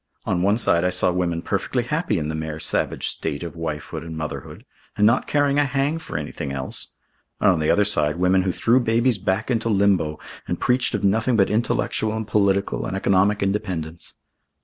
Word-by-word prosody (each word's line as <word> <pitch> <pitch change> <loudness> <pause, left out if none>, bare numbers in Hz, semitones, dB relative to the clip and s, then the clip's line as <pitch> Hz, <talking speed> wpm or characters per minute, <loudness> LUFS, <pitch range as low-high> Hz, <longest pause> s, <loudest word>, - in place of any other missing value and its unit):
On 90 - 0
one 100 +3 +3
side 85 -7 +3
I 90 - +2
saw 90 0 +2
women 85 -2 -1
perfectly 115 +5 -1
happy 150 - -1
in 75 -2 -2
the 80 - -3
mere 80 0 -4
savage - - -1
state 70 - -3
of 85 0 -7
wifehood 80 -3 -5
and 80 -1 -7
motherhood, 75 -1 -6 0.3
and 105 - +4
not 115 +4 +3
caring 145 -1 +2
a - - +4
hang 140 +3 0
for 155 - -6
anything 75 -2 -5
else, 65 -1 -1 0.5
and - - +5
on 90 - 0
the 75 - 0
other 105 - +4
side 75 -7 +2
women 90 +1 +3
who 95 0 0
threw 120 +8 +3
babies 115 -1 +1
back 100 +5 -1
into 115 -1 0
limbo 95 -7 +2 0.3
and - - -3
preached 125 -2 +2
of 105 - -3
nothing 115 +5 +2
but 95 -3 +3
intellectual 110 0 0
and 110 -1 -4
political 100 -2 +1
and 95 - -3
economic 100 +1 +2
independence. 90 -5 -3
100 Hz, 195 wpm, -22 LUFS, 85-115 Hz, 0.5 s, and